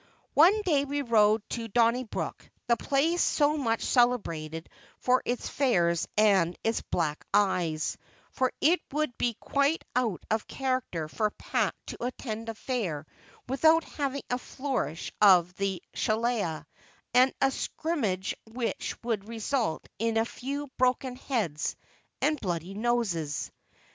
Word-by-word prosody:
One 385 +8 +6
day 300 -8 +3
we 285 0 -2
rode 215 -3 +3
to 230 -1 -3
Donnybrook, 235 +2 0 0.2
the 235 - +3
place 310 +8 +1
so 295 0 +3
much 230 -6 0
celebrated 165 - +1 0.3
for 255 0 +2
its 245 0 -2
fairs 175 - +2
and 195 -5 +4
its 225 0 +1
black 150 -3 -2
eyes; 175 -6 +1 0.3
for 260 -1 +1
it 340 +4 +4
would 305 -4 0
be 235 -2 +1
quite 280 +7 +1
out 235 -8 0
of 220 0 0
character 255 - -2
for 215 +7 0
Pat - - -1
to - - -7
attend 230 -2 -4
a 225 - -4
fair 195 - -3 0.4
without 315 +5 +4
having 280 -1 -3
a 250 - +1
flourish 250 - -3
of 180 -4 +6
the 195 -3 -2
shillelah, 215 -9 0 0.5
and 255 +2 +6
a 270 - +3
scrimmage 230 - -2 0.2
which 235 +1 -3
would 220 -4 -2
result 230 - -1
in 225 0 +1
a 225 - +3
few 280 +4 -4
broken 255 0 +1
heads 210 - -2 0.5
and 300 -2 +2
bloody 175 -1 -3
noses. 200 - -1
230 Hz, 135 wpm, -28 LUFS, 195-265 Hz, 0.5 s, One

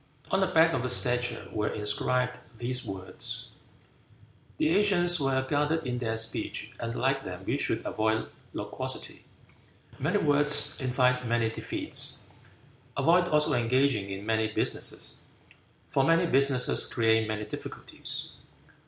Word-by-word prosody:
On 190 - +2
the 190 - +2
back 165 -2 +4
of 130 - -1
the 125 - -3
statue 125 -4 0
were 105 +1 -2
inscribed 125 +4 0 0.2
these 125 +3 -2
words: 95 -4 -6 1.1
"The - - +1
ancients 175 -2 +4
were 135 -1 0
guarded 150 +2 0
in 125 -1 -3
their 110 -2 -2
speech, 110 -1 -1
and 115 0 -4
like 135 +2 0
them 90 0 -8
we - - -1
should - - -1
avoid 110 0 -1 0.2
loquacity. - - -4 0.7
Many - - 0
words 145 0 +6
invite 125 -1 +1
many 115 -1 0
defeats. - - -2 0.8
Avoid 170 +6 +3
also 150 -3 +3
engaging 120 -3 +1
in 100 +1 -6
many 110 0 +1
businesses, - - -2 0.7
for 135 -2 +1
many 165 +4 +3
businesses 135 -4 +2
create 110 -2 +1
many 110 -1 -4
difficulties." 105 - -6
125 Hz, 130 wpm, -28 LUFS, 110-145 Hz, 1.1 s, words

